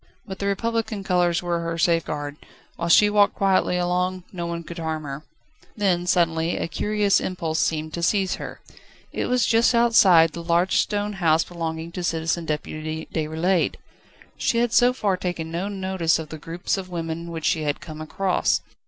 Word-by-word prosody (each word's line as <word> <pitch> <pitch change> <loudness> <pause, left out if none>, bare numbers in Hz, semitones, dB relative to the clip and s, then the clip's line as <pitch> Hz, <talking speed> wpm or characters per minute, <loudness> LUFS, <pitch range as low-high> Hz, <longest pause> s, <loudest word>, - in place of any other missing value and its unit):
But 190 -2 -8
the 200 - -1
Republican 225 0 -1
colours 180 -2 +1
were 175 -1 -1
her 165 0 -3
safeguard: 155 -4 0 0.4
whilst 170 0 +4
she 210 - +6
walked 205 -1 +3
quietly 190 -2 +2
along, 180 +1 -1
no 170 -2 -4
one 170 0 -4
could 170 +1 -8
harm 160 -1 -3
her. 140 0 -6 0.6
Then 180 -4 +1
suddenly 165 -2 +1
a - - -2
curious 205 +5 +1
impulse 165 -4 -2
seemed 155 -1 -1
to 170 - -4
seize 190 +2 +1
her. - - -8 0.5
It - - -2
was 250 0 +2
just 235 +1 +3
outside 195 -9 +6
the 170 - -7
large 170 +2 +2
stone 205 0 0
house 165 -4 +2
belonging 165 -1 -5
to 180 - -5
Citizen 165 0 -1
Deputy 155 +1 -4
Déroulède. 160 +3 0 0.6
She 245 - +1
had 235 -1 +1
so 245 +1 +5
far 205 -7 0
taken 170 -3 -4
no 175 +4 -2
notice 190 -4 0
of 160 -2 -7
the 160 - -8
groups 170 +5 -3
of 185 -1 -8
women 170 -1 -4
which 165 -1 -5
she 160 - +2
had 145 -1 -1
come 155 -2 -9
across. 185 +4 0
175 Hz, 180 wpm, -23 LUFS, 160-195 Hz, 0.6 s, she